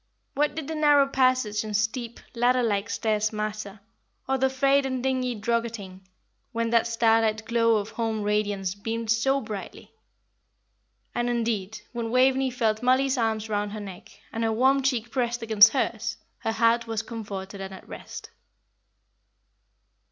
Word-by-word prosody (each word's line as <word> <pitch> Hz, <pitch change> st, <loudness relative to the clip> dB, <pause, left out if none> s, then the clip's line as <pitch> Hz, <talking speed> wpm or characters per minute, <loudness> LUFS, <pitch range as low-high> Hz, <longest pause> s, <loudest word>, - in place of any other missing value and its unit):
What 295 Hz, +1 st, 0 dB
did 315 Hz, -3 st, -5 dB
the 320 Hz, -, -3 dB
narrow 295 Hz, -2 st, +5 dB
passage 255 Hz, -6 st, +1 dB
and 210 Hz, -1 st, -1 dB
steep, 230 Hz, +2 st, -2 dB
ladder 245 Hz, +1 st, +2 dB
like 205 Hz, -2 st, 0 dB
stairs 215 Hz, -1 st, 0 dB
matter, 215 Hz, -1 st, -5 dB, 0.5 s
or 265 Hz, 0 st, 0 dB
the 265 Hz, +1 st, +3 dB
frayed 275 Hz, +1 st, +3 dB
and 260 Hz, -2 st, -3 dB
dingy 255 Hz, -2 st, 0 dB
druggetting, 225 Hz, -4 st, -2 dB, 0.5 s
when 230 Hz, -1 st, -1 dB
that 235 Hz, 0 st, +3 dB
starlight 225 Hz, -1 st, +2 dB
glow 230 Hz, -1 st, +3 dB
of 210 Hz, 0 st, -2 dB
home 225 Hz, -2 st, -2 dB
radiance 205 Hz, -3 st, 0 dB
beamed 225 Hz, +2 st, -3 dB
so 270 Hz, +5 st, +2 dB
brightly. 215 Hz, -5 st, -8 dB, 1.2 s
And 240 Hz, 0 st, -1 dB
indeed, 220 Hz, -3 st, -2 dB
when 235 Hz, -1 st, -3 dB
Waveney 260 Hz, +2 st, +3 dB
felt 225 Hz, -3 st, 0 dB
Mollie's 260 Hz, +2 st, +3 dB
arms 220 Hz, -1 st, 0 dB
round 205 Hz, -1 st, -2 dB
her 215 Hz, -, -5 dB
neck, 195 Hz, -3 st, -9 dB, 0.2 s
and 230 Hz, -, -2 dB
her 225 Hz, -, +1 dB
warm 265 Hz, +5 st, +3 dB
cheek 245 Hz, -3 st, -1 dB
pressed 240 Hz, -2 st, -1 dB
against 220 Hz, -1 st, +7 dB
hers, 225 Hz, -4 st, -1 dB, 0.2 s
her 225 Hz, -, -1 dB
heart 230 Hz, +1 st, +2 dB
was 225 Hz, -1 st, -2 dB
comforted 200 Hz, -4 st, -7 dB
and 195 Hz, 0 st, -6 dB
at 190 Hz, -, -11 dB
rest. -, -, -9 dB
230 Hz, 150 wpm, -26 LUFS, 215-255 Hz, 1.2 s, against